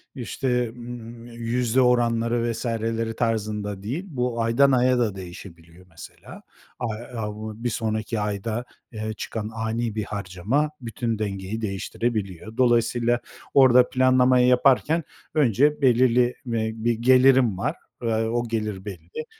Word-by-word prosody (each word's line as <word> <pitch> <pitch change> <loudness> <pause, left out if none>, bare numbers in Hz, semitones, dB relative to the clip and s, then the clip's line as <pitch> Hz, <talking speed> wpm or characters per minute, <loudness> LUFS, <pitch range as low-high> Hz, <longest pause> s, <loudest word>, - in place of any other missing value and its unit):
işte, 125 -1 -1
ımm, 120 -1 -9
yüzde 120 +1 0
oranları 120 -1 +2
vs.leri 115 -1 -2
tarzında 105 -3 -2
değil. 140 - -3
Bu 125 -6 -2
aydan 125 +5 +4
aya 125 0 +3
da 105 -5 0
değişebiliyor 85 -1 -11
mesela. 80 - -12 0.4
A 120 - -2 0.3
a 105 -2 -4
bu 110 +1 -8
bir 120 - +1
sonraki 110 0 -2
ayda, 105 +3 -3 0.3
eee, 110 -1 -4
çıkan 110 -1 -5
ani 115 0 -2
bir 110 - -1
harcama 105 +9 -1
bütün 115 -1 -3
dengeyi 100 +1 -4
değiştirebiliyor. 105 0 -3
Dolayısıyla, 120 -1 +2 0.3
orada 125 -2 +6
planlamayı 130 -1 +4
yaparken 135 +6 +3 0.3
önce 145 +1 +3
belirli, 125 -1 +4
eee, 110 -2 -1
bir 115 +1 0
gelirim 125 -2 +4
var, - - -1 0.3
eee, 115 - 0 0.2
o 120 +1 -1
gelir 105 -3 -3
belli, 95 - -7
115 Hz, 125 wpm, -24 LUFS, 110-125 Hz, 0.4 s, orada